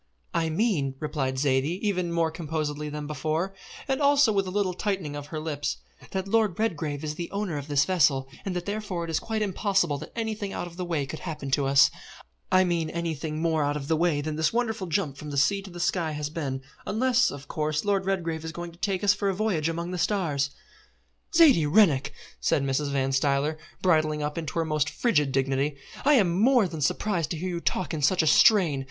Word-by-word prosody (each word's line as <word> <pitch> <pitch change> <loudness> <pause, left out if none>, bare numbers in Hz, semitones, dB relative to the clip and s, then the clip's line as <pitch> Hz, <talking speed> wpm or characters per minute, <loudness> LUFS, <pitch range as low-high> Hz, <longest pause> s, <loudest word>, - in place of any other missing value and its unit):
"I 165 -1 +1
mean," 155 - 0
replied 140 -4 -2
Zaidie 140 +4 +1
even 180 -4 0
more 165 -1 +1
composedly 155 -2 -3
than 150 0 -5
before, 155 +5 -2 0.3
and 270 +1 0
also 280 -4 +5
with 195 -2 0
a - - -2
little 190 -1 0
tightening 185 -6 -2
of 145 0 -6
her 155 - -5
lips, 150 -2 -3 0.3
"that 190 0 -3
Lord 215 -4 +2
Redgrave 160 -9 -2
is 150 -1 -2
the 170 +2 -5
owner 200 -5 -3
of 145 0 -5
this 145 -1 +3
vessel, 140 -7 +2 0.2
and 190 -2 -3
that 175 -1 -3
therefore 205 -4 -3
it 165 - -4
is 160 - +1
quite 220 -1 -2
impossible 190 -6 0
that - - -9
anything 215 -3 -3
out - - -3
of 175 -1 -10
the 180 0 -4
way 160 -5 -1
could 155 +3 -7
happen 150 -5 -5
to 140 0 +2
us 135 -1 +6 0.6
I 185 0 +6
mean 170 -3 0
anything 160 -2 -3
more 160 -2 +2
out 145 +1 0
of 140 -1 -6
the 160 - +2
way 160 -2 +1
than 155 +1 -4
this 160 -1 +2
wonderful 225 -5 -1
jump 155 -5 -1
from 150 - -8
the 140 - -4
sea 195 +9 +3
to 195 - -10
the 175 -1 -9
sky 170 -2 0
has 150 0 -4
been, 135 -5 -4 0.2
unless, 255 +3 +3
of 145 0 -9
course, 155 +1 -2
Lord 195 -2 +1
Redgrave 165 -4 -1
is 160 - -5
going 175 +1 -6
to 170 - -19
take 195 -1 -1
us 200 -1 +5
for 200 0 -1
a 190 - -1
voyage 180 -7 0
among 170 +2 -3
the 180 - -3
stars." 155 -9 0 0.9
"Zaidie 270 - +6
Rennick!" 160 -9 +4 0.3
said 140 - +1
Mrs. 140 +1 0
Van 135 -1 0
Stuyler, 140 +3 +1 0.3
bridling 155 -4 +2
up 150 0 -3
into 160 -4 -5
her 165 - +1
most 155 -2 0
frigid 150 - +1
dignity, 135 +2 0 0.3
"I 295 +1 +5
am 185 -5 +3
more 245 -3 +5
than 160 -3 -6
surprised 170 +2 0
to 170 - -3
hear 185 +4 -3
you 175 -1 -3
talk 180 +1 -1
in 155 - -3
such 170 +4 +3
a - - 0 0.2
strain. 180 -11 +4
165 Hz, 220 wpm, -26 LUFS, 150-195 Hz, 0.9 s, us